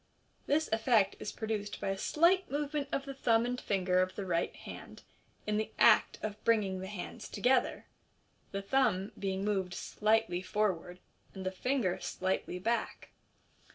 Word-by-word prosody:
This 310 +2 +2
effect 220 -3 +3
is - - -4
produced 215 -2 -3
by - - -2
a 195 - 0
slight 340 - +3
movement 290 0 -2
of 275 - -1
the 275 - -5
thumb 235 -3 +2
and 250 +1 -2
finger 185 -2 +2
of 185 0 -1
the 200 - -4
right 170 -2 0
hand - - -10 0.4
in 210 0 0
the 215 - -1
act - - +5
of 215 0 -5
biinging 205 -5 +2
the 190 - -5
hands 190 -3 -7
together, 245 +5 +1 0.7
the 195 0 -3
thumb 200 -5 +1
being 195 0 -2
moved 190 -4 -1
slightly 215 -4 +1
for 205 +2 +1
ward, 180 +2 -11 0.4
and 190 -1 -6
the 185 - -1
ringer 250 -9 +1
slightly 185 -1 -2
back. 230 +6 -2
210 Hz, 160 wpm, -32 LUFS, 190-245 Hz, 0.7 s, act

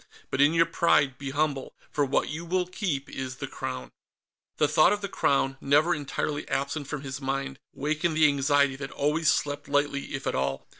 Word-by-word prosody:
But 135 - +1
in 145 +3 +5
your 165 0 +5
pride, 145 -5 +2
be 140 -1 -4
humble, 145 -1 -1 0.2
for 145 - +1
what 140 0 +1
you 155 +3 -5
will 180 +1 0
keep 175 -7 -3
is 130 -1 -5
the - - -5
Crown." 65 0 -6 0.7
The 150 - +3
thought 155 +5 +5
of 205 - -3
the 200 - -2
Crown, 135 -6 +1
never 150 +5 +4
entirely 145 0 -3
absent 140 +1 -2
from 150 -1 -4
his 135 0 -6
mind, 135 0 -3
wakened 155 +3 -1
the 155 -1 +6
anxiety 140 -1 +2
that 135 0 -6
always 150 +3 +1
slept 145 -1 -1
lightly 145 -1 0
if 135 - -6
at - - 0
all. 65 0 -1
145 Hz, 195 wpm, -27 LUFS, 135-155 Hz, 0.7 s, the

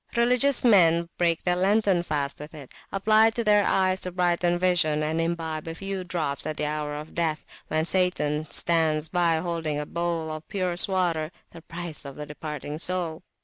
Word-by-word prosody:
Religious 250 +3 +3
men 170 -7 +5
break 170 -2 +1
their 180 -1 +2
lenten 195 0 +2
fast 145 -4 -2
with 150 +2 -9
it, 140 -4 -11 0.2
apply 215 +3 +4
it 225 - -2
to 235 - 0
their 210 -1 +4
eyes 185 -1 +1
to 180 - -2
brighten 175 -1 +1
vision, 170 -4 +2
and 160 +2 -1
imbibe 165 -2 -3
a 165 - -5
few 195 +1 -5
drops 165 -6 -3
at 155 -1 -4
the 150 - -1
hour 150 0 -3
of 150 +1 -8
death, 160 -2 -1 0.2
when 155 0 0
Satan 155 -5 0
stands 160 -2 +2
by 170 -1 +2
holding 160 -3 -2
a 150 - -3
bowl 170 -1 -3
of 155 0 -7
purest 180 -3 +1
water, 175 -5 0 0.2
the 165 - -12
price 170 -1 -7
of 140 -2 -8
the 150 - -6
departing 150 0 -7
soul. 175 -2 -1
170 Hz, 190 wpm, -25 LUFS, 155-185 Hz, 0.2 s, men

